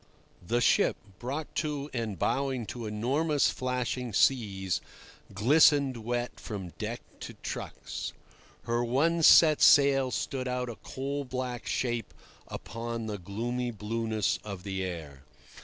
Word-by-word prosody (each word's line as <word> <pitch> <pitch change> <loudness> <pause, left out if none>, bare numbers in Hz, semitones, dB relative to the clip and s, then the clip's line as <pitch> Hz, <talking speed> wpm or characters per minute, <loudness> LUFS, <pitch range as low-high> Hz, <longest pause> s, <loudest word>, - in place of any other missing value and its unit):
The 120 +7 0
ship, - - +3 0.2
brought 140 +5 -4
to 145 -3 -2
and 115 -5 -3
bowing 135 - 0
to 110 +2 -6
enormous 140 +8 +1
flashing 125 -2 -2
seas, 95 -6 +2 0.5
glistened 140 +5 +4
wet 120 +2 -3
from 100 -6 -6
deck - - -4 0.2
to - - -8
trucks; - - -5 0.5
her 120 +1 0
one 155 +8 +2
set 155 -1 +7
sail 135 -2 +6
stood 130 0 -3
out 125 -1 -2
a - - -8
coal 140 +2 -4
black 125 -2 -4
shape 120 -4 -2 0.3
upon 115 0 -5
the 105 -2 -4
gloomy 120 +7 -3
blueness 110 -1 -1
of 100 -4 -7
the 95 -1 -3
air. 80 -7 -6
120 Hz, 125 wpm, -29 LUFS, 105-135 Hz, 0.5 s, set